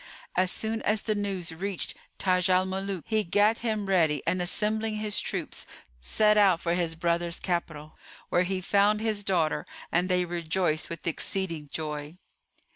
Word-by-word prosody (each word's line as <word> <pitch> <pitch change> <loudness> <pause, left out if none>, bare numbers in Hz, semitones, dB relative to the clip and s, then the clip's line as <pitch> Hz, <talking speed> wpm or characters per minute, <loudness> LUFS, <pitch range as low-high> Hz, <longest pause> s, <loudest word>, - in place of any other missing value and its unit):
As 185 0 +4
soon 220 +3 -1
as 215 0 +1
the 215 - 0
news 195 -4 -2
reached 190 +2 -2 0.2
Taj 185 -1 +2
al 185 0 +4
Muluk 190 -1 -3
he 220 -1 +1
gat 205 +5 +3
him 215 -3 -1
ready 160 -7 +2
and 180 +2 +1
assembling 215 +4 0
his 210 -1 +1
troops - - -4 0.3
set 210 - +3
out 190 -5 +5
for 170 0 -1
his 170 -2 0
brother's 170 0 0
capital, 155 -4 -3 0.3
where 175 - +3
he 185 +1 -1
found 205 +3 +3
his 215 -2 0
daughter 175 -6 0 0.2
and 180 +2 +1
they 180 -1 +2
rejoiced 170 -1 -1
with 165 -1 -7
exceeding 170 -2 -2
joy. 150 +1 -5
185 Hz, 160 wpm, -28 LUFS, 170-205 Hz, 0.3 s, out